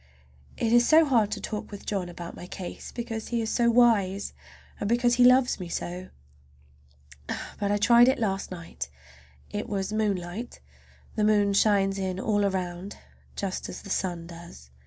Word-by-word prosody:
It 230 0 +1
is 240 0 +5
so 320 +1 +7
hard 235 -7 +3
to - - -3
talk 210 -2 -5
with 205 -1 -9
John 190 -4 -2
about 175 0 -8
my 175 - -9
case, 180 -1 -7
because 230 -2 -5
he 235 - -1
is 225 -1 -2
so 235 -1 +3
wise, 215 -5 +3 0.5
and 205 - -2
because 240 +1 +3
he 245 0 +4
loves 250 -1 +5
me 180 -2 -6
so. 180 +2 -5 1.5
But 200 -1 0
I 205 - +2
tried 235 +3 +6
it 260 - +3
last 195 -3 -1
night. 165 - -7 0.6
It 205 +1 -4
was 195 0 -2
moonlight. 205 +1 -2 0.6
The 215 - +1
moon 205 -1 +3
shines 195 -1 +3
in 190 -1 -2
all 205 0 +1
around, 185 0 -3 0.4
just 195 -2 -3
as - - -8
the 200 - -8
sun 175 -3 -2
does. 170 - -12
205 Hz, 170 wpm, -27 LUFS, 185-230 Hz, 1.5 s, so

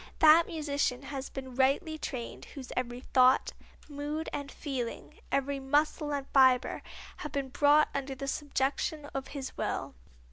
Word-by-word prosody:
That 320 +1 +7
musician 285 -5 -1
has 270 -1 -5
been 260 -1 -7
rightly 275 +6 +2
trained 250 -6 -5
whose 265 -3 -8
every 245 0 -3
thought, 255 0 +4 0.3
mood 295 +2 -4
and 285 -1 -4
feeling, 260 -6 -5
every 275 0 0
muscle 295 +2 +1
and 280 -1 -2
fibre, 260 -2 +4 0.4
have 300 - -6
been 275 -2 -2
brought 290 +3 +4
under 275 -1 -3
the 275 +1 -5
subjection 290 +2 -1
of 270 -1 -3
his 275 -2 -6
will. - - -2
275 Hz, 145 wpm, -30 LUFS, 265-295 Hz, 0.4 s, That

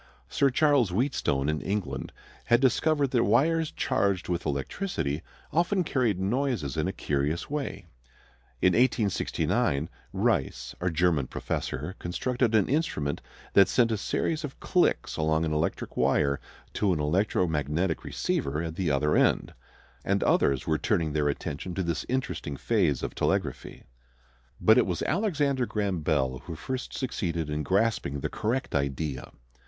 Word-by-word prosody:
Sir 140 - +3
Charles 140 -4 +3
Wheatstone 90 - 0
in 75 -1 0
England 90 -8 -3 0.3
had 120 - +4
discovered 140 +2 +2
that 120 -3 +3
wires 155 +9 +3
charged 100 -3 0
with 90 0 -1
electricity 75 - -2 0.3
often 175 +3 +2
carried 125 - 0
noises 105 - -1
in - - 0
a - - 0
curious 75 - -2
way. 140 -10 -3 0.8
In 90 - +5
1869 100 - +1 0.2
Reis, - - 0
a 90 - +1
German 80 -5 +2
professor, 75 +8 -3
constructed 120 +6 0
an 105 -3 +4
instrument 130 - -1 0.3
that 100 -2 +7
sent 115 +3 +3
a - - +2
series 155 +9 -1
of 140 -2 -7
clicks 180 -2 +1
along 80 +1 +1
an 80 - -1
electric 75 +2 -2
wire 70 -1 +2 0.3
to 100 -3 +1
an 80 - -2
electromagnetic 80 -1 0
receiver 70 +2 -1
at 80 -1 -5
the 90 -4 0
other 75 +2 +2
end. - - +2 0.5
And - - +1
others 70 -2 +2
were 80 -1 +1
turning 85 -8 0
their 75 -1 +1
attention 75 +5 -4
to 95 - -1
this 85 -1 -2
interesting 130 - -2
phase 90 - +1
of - - -3
telegraphy. - - -2 0.8
But - - +6
it - - +2
was - - -2
Alexander 145 - +1
Graham 100 -4 -1
Bell 70 -5 0
who 85 - -6
first 130 +10 -5
succeeded 85 - -2
in 75 0 -1
grasping 95 -7 0
the - - -2
correct 120 +5 -2
idea. 70 0 -2
90 Hz, 145 wpm, -28 LUFS, 75-125 Hz, 0.8 s, that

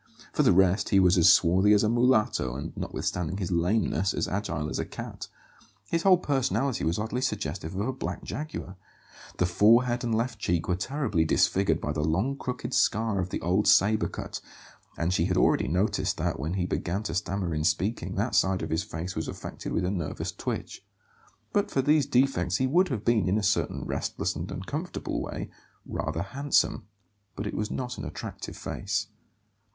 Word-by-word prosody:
For - - +2
the - - +5
rest, 95 +2 +3
he 100 - +5
was 90 -1 +5
as 85 -3 +6
swarthy 95 +4 +5
as 105 - +4
a - - +3
mulatto, 110 - +2
and, 70 +4 -6
notwithstanding 90 +1 -3
his 95 -3 -3
lameness, 90 +1 +1
as - - -1
agile 90 -6 -2
as - - -3
a - - 0
cat. - - -7 0.6
His 165 - +1
whole 185 0 +6
personality 135 -4 0
was 80 +2 +1
oddly 110 +4 -2
suggestive 95 - -3
of 100 +3 -1
a 130 - -1
black 90 -8 -5
jaguar. 120 -7 -6 0.6
The 90 - +2
forehead 115 +7 +4
and 115 -2 0
left 115 -1 -1
cheek 85 -4 0
were 90 - +1
terribly 110 - 0
disfigured 95 +4 +2
by 75 - -3
the 75 0 -2
long 95 - 0
crooked 125 -2 -5
scar 110 -2 +2
of 90 0 -2
the - - -4
old 95 +5 +1
sabre 105 +2 +4
cut; - - -6 0.6
and 85 +2 0
she 85 -2 +2
had 90 0 0
already - - +3
noticed 90 +9 0
that, - - -1
when 80 +6 -2
he 90 -2 0
began 90 +3 -2
to 80 - -3
stammer 90 -1 -2
in 75 0 -1
speaking, 95 +3 0
that 105 +3 -1
side 95 -2 +2
of 80 - -4
his 80 +2 +1
face 90 -2 -5
was 80 - -3
affected - - -6
with 90 - 0
a 90 - 0
nervous 85 -7 -3
twitch. - - -5 0.7
But 205 - +1
for 135 - 0
these 150 -1 +3
defects 135 0 +2
he 130 - +1
would 175 +8 +3
have 125 - -4
been, 110 -6 +3
in 100 - +2
a 110 - -1
certain 100 - 0
restless - - -2
and - - -5
uncomfortable - - -4
way, - - -5 0.3
rather 80 +2 -3
handsome; 130 -1 0 0.5
but 100 - -4
it 105 - -3
was 105 0 -2
not 125 -1 -4
an - - -5
attractive - - -7
face. - - -2
100 Hz, 190 wpm, -27 LUFS, 90-120 Hz, 0.7 s, as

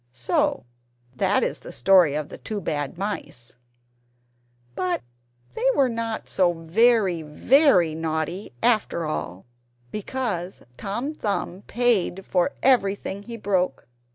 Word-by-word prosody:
So 120 -1 0 0.5
that - - +2
is - - -2
the - - -10
story 170 +3 +4
of 150 -1 -3
the - - -10
two 215 -2 -4
Bad 145 -5 -3
Mice, 150 - -5 1.2
but 180 -9 -1 0.5
they 260 - -1
were 275 -3 +3
not 230 -1 -3
so 180 -2 +2
very 185 +2 +3
very 180 - +4
naughty 160 +4 -3
after 215 -8 +2
all, 95 -11 -4 0.5
because 210 -5 -3
Tom 235 - -3
Thumb 200 - -3
paid 220 -6 +1
for 180 -2 +1
everything 200 -6 +2
he 230 +2 -8
broke. 185 - -1
190 Hz, 120 wpm, -24 LUFS, 160-225 Hz, 1.2 s, story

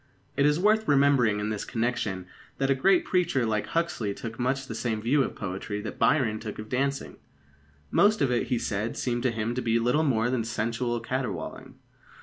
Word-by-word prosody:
It 140 +1 +4
is 150 +2 +2
worth 215 +3 +3
remembering 135 -7 +4
in 105 +1 -2
this 105 -2 -3
connection 115 -6 -2 0.3
that 135 0 +1
a - - +6
great 180 +8 +3
preacher 175 -9 +1
like 105 -2 -1
Huxley 165 -12 -1
took 110 0 -7
much 130 +2 0
the 115 - -6
same 110 -1 -2
view 130 +7 +2
of - - -2
poetry 100 +1 -4
that - - -7
Byron 120 -8 +2
took 105 -2 -6
of 110 0 -8
dancing. 135 +2 -2 0.7
Most 210 +1 +4
of 135 - +2
it, 120 - 0
he 125 - +1
said, 105 0 -2
seemed 120 -1 -1
to 125 0 +1
him 115 +1 -2
to 125 - -2
be 115 -1 +1
little 125 +6 +2
more 120 -4 +1
than 125 -3 0
sensual 115 +2 -2
caterwauling. 115 -8 -4
120 Hz, 195 wpm, -27 LUFS, 110-135 Hz, 0.7 s, a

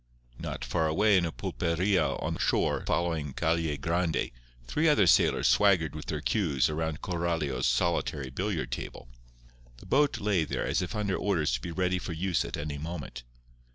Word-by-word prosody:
Not 60 - -5
far 80 +6 0
away 100 +7 +3
in 90 -2 +3
a - - -4
pulperia 85 -3 0
on - - -1
the - - -6
shore - - +1
following 80 -5 -1
Calle 80 -2 0
Grande 85 +3 0 0.3
three 155 - +2
other 110 -10 +4
sailors 85 - +4
swaggered 80 +6 +4
with 75 - -7
their 75 -1 -3
cues 75 - +1
around 80 0 -3
Coralio's 85 -5 -1
solitary 70 0 0
billiard 85 - -2
table. - - -6 0.7
The - - -14
boat 145 +1 +2
lay 100 -5 +1
there - - -2
as - - 0
if 90 +5 -4
under 100 -3 0
orders 85 -9 0
to 60 -1 -1
be 85 - -5
ready 90 +1 0
for 85 - -5
use 90 +1 0
at - - -5
any 75 -1 -4
moment. 80 -5 -6
85 Hz, 175 wpm, -29 LUFS, 75-90 Hz, 0.7 s, other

